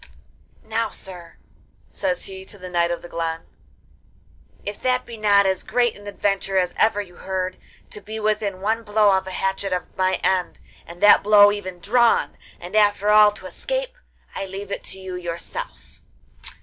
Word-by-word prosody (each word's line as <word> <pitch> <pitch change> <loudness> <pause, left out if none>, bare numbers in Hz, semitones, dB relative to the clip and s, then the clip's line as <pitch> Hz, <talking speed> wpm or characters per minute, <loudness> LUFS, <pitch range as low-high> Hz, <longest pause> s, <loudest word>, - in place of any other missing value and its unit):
'Now, 225 0 -1
sir,' 175 -3 -10 0.5
says 270 -2 -2
he 190 -1 -9
to 205 - -13
the 185 -1 -9
Knight 170 -1 +2
of 175 - -3
the - - -8
Glen, 165 -1 -3 1.2
'if 205 0 -5
that 255 0 +1
be 235 - -9
not 205 -2 +4
as 190 -1 +1
great 240 -2 +1
an 205 0 -13
adventure 195 -1 -1
as 180 -1 +1
ever 210 -1 +2
you 180 -3 -13
heard, 185 -1 -3 0.3
to 210 - -7
be 220 +1 -6
within 210 -3 -1
one 220 +3 0
blow 210 -2 +3
of 190 0 -1
a - - -5
hatchet 195 +1 -2
of 180 - -4
my 185 0 +1
end, 185 -2 +1 0.3
and 170 +1 -11
that 205 - +8
blow 205 0 +7
even 185 -3 -6
drawn, 235 +6 +2 0.2
and 175 +4 -8
after 205 -1 +3
all 210 0 +7
to - - -11
escape, - - -4 0.4
I 195 - -4
leave 195 +1 -7
it - - -4
to - - -4
yourself. 180 - -7
200 Hz, 175 wpm, -22 LUFS, 185-215 Hz, 1.2 s, that